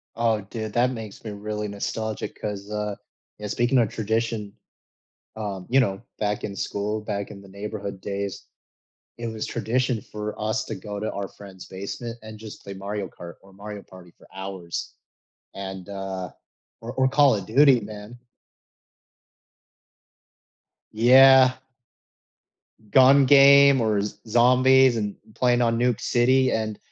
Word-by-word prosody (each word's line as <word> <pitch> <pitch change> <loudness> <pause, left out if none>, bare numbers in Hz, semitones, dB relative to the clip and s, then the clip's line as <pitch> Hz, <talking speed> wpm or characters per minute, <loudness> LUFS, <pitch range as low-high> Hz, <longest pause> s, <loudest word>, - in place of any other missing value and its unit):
Oh, 115 -2 +1
dude, 110 +1 -6
that 125 +1 +3
makes 110 -4 -9
me 110 - -5
really 105 +1 -4
nostalgic 110 +2 -4
'cause, 100 -1 -5
uh, 105 -1 -3 0.4
eh, 105 - -5
speaking 120 +5 +1
of 115 -3 +3
tradition, 110 -1 -2 0.8
um, 100 -4 -5
you 135 - +3
know, 100 -7 +1 0.2
back 105 -1 -1
in 100 -1 -5
school, 105 +2 -3
back 100 -1 -4
in 100 -1 -10
the 100 - -15
neighborhood 100 0 -6
days, 100 0 -5 0.7
it 120 0 -5
was 110 -1 -4
tradition 120 +1 -1
for 105 +1 -7
us 110 +1 -1
to 110 - -5
go 105 +1 -7
to 110 +1 -3
our 100 -1 -4
friend's 95 -2 -12
basement 115 +5 -7
and 110 0 -10
just 110 -1 -11
play 100 - -7
Mario 100 +1 -4
Kart 85 0 -11
or 95 - -19
Mario 105 +1 -8
Party 90 -2 -15
for - - -22
hours 95 -3 -6 0.6
and, 95 -2 -7
uh 95 -2 -5 0.5
or 115 +2 -7
or 130 0 +2
Call 140 -1 +4
of 100 -3 -5
Duty, 135 +4 +5
man. 105 +2 -9 2.8
Yeah. 130 +3 +7 1.4
Gun 135 +2 +6
game 140 0 +7
or 110 -3 +1
Z 105 - -5
Zombies!!! 130 +2 +5
and 105 -2 -2 0.2
playing 125 -1 +2
on 115 -1 +1
Nuke 125 -2 +1
City 130 +2 +3
and 110 -1 -2
110 Hz, 145 wpm, -24 LUFS, 100-120 Hz, 2.8 s, Yeah